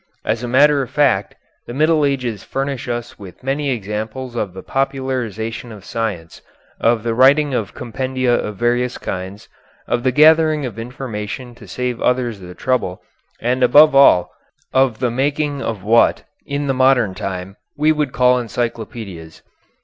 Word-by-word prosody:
As 110 +1 -1
a 120 - -4
matter 140 +3 +4
of 130 - -5
fact, 125 -10 +1 0.3
the 120 - -7
Middle 155 +1 +3
Ages 125 -7 -2
furnish 135 -2 -4
us 120 0 -5
with 95 +3 -12
many 140 +2 -1
examples 110 +2 -4
of 100 -5 -3
the 95 - -8
popularization 125 -4 -3
of 105 -3 -12
science, 100 -8 -4 0.4
of 115 -1 +2
the 115 -1 -1
writing 140 +4 +4
of 110 -6 -3
compendia 130 +1 -1
of 105 -3 -2
various 120 +2 0
kinds, 95 +3 -6 0.4
of 120 - 0
the 130 +1 +1
gathering 155 +1 +5
of 115 -2 -6
information 120 0 -6
to 115 -3 -15
save 125 +5 -3
others 125 -4 0
the 90 -1 -10
trouble, 125 -8 -1 0.4
and, 125 +2 -1
above 145 +4 +7
all, 135 -10 +5 0.4
of 130 -4 +3
the 125 -2 -1
making 145 +2 -1
of 110 -7 -4
what, 115 +3 +3 0.2
in 140 +1 -2
the 135 - 0
modern 130 -6 +3
time, 95 0 -5 0.2
we 155 +2 +3
would 150 -4 -1
call 125 -1 +3
encyclopedias. 110 -8 -5
125 Hz, 155 wpm, -19 LUFS, 110-135 Hz, 0.4 s, above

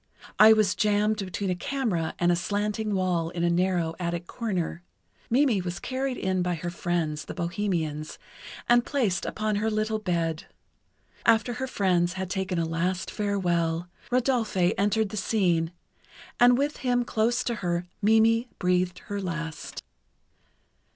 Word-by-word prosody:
I 215 +1 +9
was 215 -4 +4
jammed 210 0 +2
between 190 +1 -3
a - - 0
camera 185 -6 -2
and 175 0 +3
a - - +3
slanting 205 +3 -1
wall 180 -3 0
in 170 0 -3
a 170 - +3
narrow 175 -2 +1
attic 170 -1 -2
corner. 185 -7 -3 0.5
Mimi 245 -5 +3
was 175 -1 -4
carried 260 0 -2
in 185 -1 0
by 180 0 0
her 175 +2 -4
friends, 165 -4 -2
the - - -7
bohemians, 170 -4 -2 0.5
and 240 0 +5
placed 225 -11 0
upon 215 -1 -1
her 220 +2 0
little 215 0 -1
bed. 170 -5 -2 0.8
After 225 +2 +3
her 260 +3 -3
friends 180 -6 +1
had 190 -1 -4
taken 190 -2 -2
a 165 - +1
last 175 +3 -1
farewell, 175 -5 0 0.2
Rodolphe 235 -8 +1
entered 210 +1 +1
the 215 - -6
scene, 175 -5 +1 0.7
and 245 0 +6
with 285 +2 0
him 245 -2 +1
close 240 +2 +1
to 240 - -1
her 175 -1 -1 0.2
Mimi 225 +3 +4
breathed 180 0 0
her 205 -1 -4
last. 165 -3 -5
190 Hz, 150 wpm, -27 LUFS, 175-220 Hz, 0.8 s, I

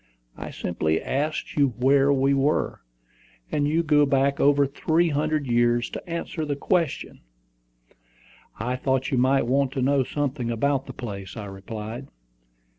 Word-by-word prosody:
I - - -7
simply 80 -2 -1
asked 150 +3 -2
you 140 -5 +2
where 135 +2 +4
we 135 0 +3
were, 140 +2 0 0.7
and 145 -1 +1
you 160 +3 +1
go 150 -2 +4
back 140 0 +2
over 145 0 +4
three 160 +5 +1
hundred 150 0 0
years 120 -1 +2
to - - -8
answer 170 -1 -3
the 145 -2 -2
question." 165 0 -1 1.4
"I 125 +4 -2
thought 130 +1 0
you 130 - +2
might 130 +1 +3
want 135 +2 +1
to 135 - -2
know 140 0 +3
something 135 -3 -2
about 135 +4 0
the - - -7
place," 100 -3 -7
I 105 - -5
replied. 110 +5 -7
135 Hz, 150 wpm, -25 LUFS, 120-145 Hz, 1.4 s, where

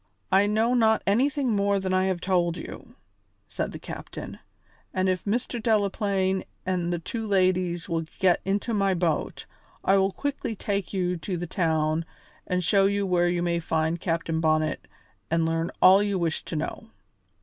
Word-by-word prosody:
"I 195 +2 +5
know 220 +3 +2
not 220 -2 +3
anything 260 +5 +2
more 200 0 +2
than 190 -1 -2
I 185 0 +3
have 185 -2 -1
told 175 -2 +1
you," - - -9 0.5
said - - -3
the - - -7
captain. - - -8 0.6
"And 185 0 +1
if 185 -1 -1
Mr. 235 +3 -1
Delaplaine 200 -3 +1 0.2
and 180 -2 -1
the 175 - 0
two 220 +7 -5
ladies 185 -3 +1
will 165 -2 -1
get 185 -3 +3
into 200 +4 -1
my 195 -2 +2
boat, 170 -3 -1 0.4
I 195 - +4
will 195 0 +2
quickly 280 -2 -3
take 200 -2 -2
you 180 -2 -1
to 180 +2 -4
the 175 - -3
town 160 -2 0 0.4
and 180 0 0
show 195 +3 +4
you 200 0 0
where 175 -2 +2
you 175 0 0
may 170 -1 0
find 160 0 -1
Captain 165 -2 -1
Bonnet 155 -1 +1 0.4
and 165 0 +2
learn 165 +1 0
all 190 +2 +8
you 205 -2 0
wish 170 -3 -1
to - - -5
know." 160 +8 -4
185 Hz, 170 wpm, -26 LUFS, 170-200 Hz, 0.6 s, all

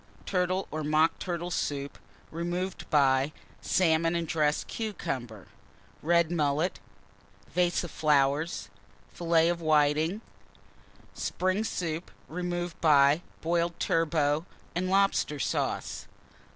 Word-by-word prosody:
_ - - -23
Turtle 185 0 0
or 155 0 -3
Mock 155 +2 +2
Turtle 175 -1 -3
Soup, 140 -4 -2 0.4
removed 175 +3 -3
by 135 -1 +3 0.3
Salmon 165 -1 +2
and 170 -1 -1
dressed 150 -2 +1
Cucumber. 125 - -5 0.5
Red 170 +1 +3
Mullet. 155 +1 0 0.7
Vase 175 0 +1
of 175 - -6
Filets 145 - +1 0.5
of 170 0 +3
Whitings. - - -12
Flowers. 155 +5 +2 0.9
Spring 185 +3 -1
Soup, 170 -5 -3 0.2
removed 175 0 -4
by 145 0 +5 0.2
Boiled 170 +1 0
Turbot 155 -2 +1 0.3
and 185 +2 -1
Lobster 195 -6 +2
Sauce. - - -2
165 Hz, 105 wpm, -29 LUFS, 150-175 Hz, 0.9 s, by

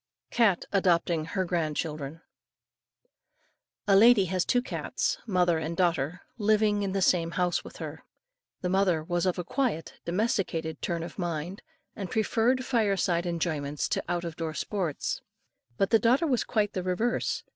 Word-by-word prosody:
CAT 215 -7 +3
ADOPTING 170 -4 +2
HER 185 +3 -2
GRAND 165 -4 -1
CHILDREN. 150 0 -4 1.7
A 200 - +5
lady 215 -1 +7
had 185 +1 -1
two 245 -1 +2
cats, - - -2
mother 180 -4 +2
and 160 +2 -4
daughter, 170 -1 0 0.2
living 210 -1 +3
in 195 -2 -2
the 195 -1 +1
same 170 -2 +3
house 175 +1 0
with - - -11
her. - - -7 0.6
The 180 - -1
mother 185 -4 +2
was 175 +2 0
of 180 - 0
a 180 - -2
quiet, 220 - -2
domesticated 170 -4 -1
turn 170 -2 -2
of 175 - -8
mind, 175 +2 -3 0.3
and 195 -4 -5
preferred 235 +5 +1
fire 220 -6 +1
side 175 -2 0
enjoyments 155 -4 -2
to - - -1
out 175 0 -1
of 165 -1 -5
door 160 -2 -3
sports; 180 -7 -2 0.6
but 195 - +1
the 225 - +6
daughter 255 +9 +3
was 255 -7 +1
quite 210 -2 0
the 185 - -2
reverse. 185 +7 -1
180 Hz, 160 wpm, -28 LUFS, 165-205 Hz, 1.7 s, lady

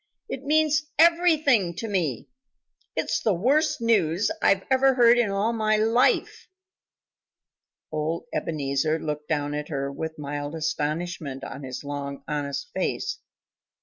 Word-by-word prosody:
It 270 - -6
means 305 +1 +3 0.2
everything 315 - +4
to 225 - -4
me. 170 - -1 0.7
It's - - 0
the 215 -4 +1
worst 295 - +2
news 200 -5 +2
I 195 -1 +3
ever 265 0 +4
heard 240 -1 +6
in 230 -4 +2
all 200 +4 0
my 215 -1 +1
life." 225 +3 +2 1.4
Old 155 +5 -2
Ebenezer 150 0 -1
looked 150 -1 -5
down 145 -2 -1
at 150 0 -4
her 140 -2 -2
with 160 +3 -5
mild 145 +1 -5
astonishment 155 -2 -3
on 135 - -7
his 130 0 -6
long, 140 -1 -5
honest 145 - -3
face. - - -2
170 Hz, 130 wpm, -25 LUFS, 145-240 Hz, 1.4 s, heard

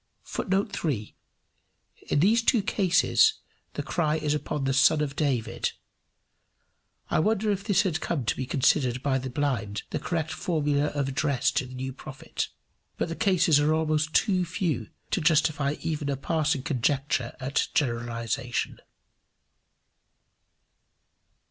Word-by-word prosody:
[Footnote 195 +1 -1
3: 120 -10 -3 0.9
In 145 - +2
these 220 +6 +4
two 230 -2 +3
cases, 200 - +3 0.4
the - - -3
cry 155 -3 0
is 150 -2 0
upon 150 -1 -2
the 135 0 +1
Son 150 +3 +5
of 145 -2 -2
David: 135 -7 -1 1.4
I - - +3
wonder 215 +4 +2
if 200 -1 -2
this 205 -3 +3
had 165 -5 -1
come 145 -8 -2
to - - +1
be 130 - -4
considered 130 -2 +2
by 135 -2 +1
the 130 0 -5
blind 120 -7 -2
the - - -1
correct 165 -2 -2
formula 150 -4 0
of 145 -2 -1
address 135 -1 +1
to 130 - -1
the 130 - -10
new 130 +1 -4
prophet. 140 +1 -5 0.5
But - - -1
the 165 - -3
cases 180 -7 +3
are 150 +2 +3
almost 155 -1 0
too 185 -4 +3
few 165 - -2 0.2
to 185 - +1
justify 150 -2 +2
even 150 -3 -2
a 140 - -1
passing 155 -1 0
conjecture 130 -1 0
at 135 +1 0
generalization. 120 -1 -1
150 Hz, 140 wpm, -27 LUFS, 130-165 Hz, 1.4 s, Son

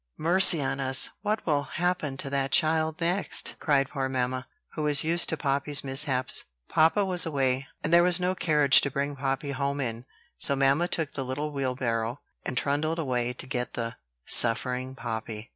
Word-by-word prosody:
'" - - -53
"Mercy 170 -1 +4
on 135 +1 -2
us! 130 0 0
what 215 +1 -2
will 150 -3 +1
happen 155 -1 -2
to 140 - -2
that 135 0 -1
child 160 0 +2
next?" 175 +4 0
cried 140 -3 +1
poor 135 -2 -3
mamma, 130 0 -2 0.3
who 155 - -5
was 150 -2 +3
used 170 +2 +1
to 160 - 0
Poppy's 140 +1 +1
mishaps. 135 -1 +1 0.2
Papa 165 +6 +2
was 180 -3 +4
away, 135 -4 -1 0.2
and 160 - -1
there 170 - +7
was 175 0 +4
no 180 +1 0
carriage 150 -6 +4
to 140 - -2
bring 140 +2 -3
Poppy 135 +1 -3
home 140 +1 -3
in; 120 -2 -4 0.3
so 140 - +3
mamma 140 +5 +2
took 160 -4 -2
the 135 - -5
little 145 +4 -4
wheelbarrow, 125 -3 -2 0.2
and 130 - -5
trundled 155 +3 -1
away 125 -6 -1
to - - -6
get 125 -2 -4
the 115 0 -4 0.3
suffering 125 +2 +2
Poppy. 110 -2 -6
140 Hz, 180 wpm, -26 LUFS, 130-160 Hz, 0.3 s, there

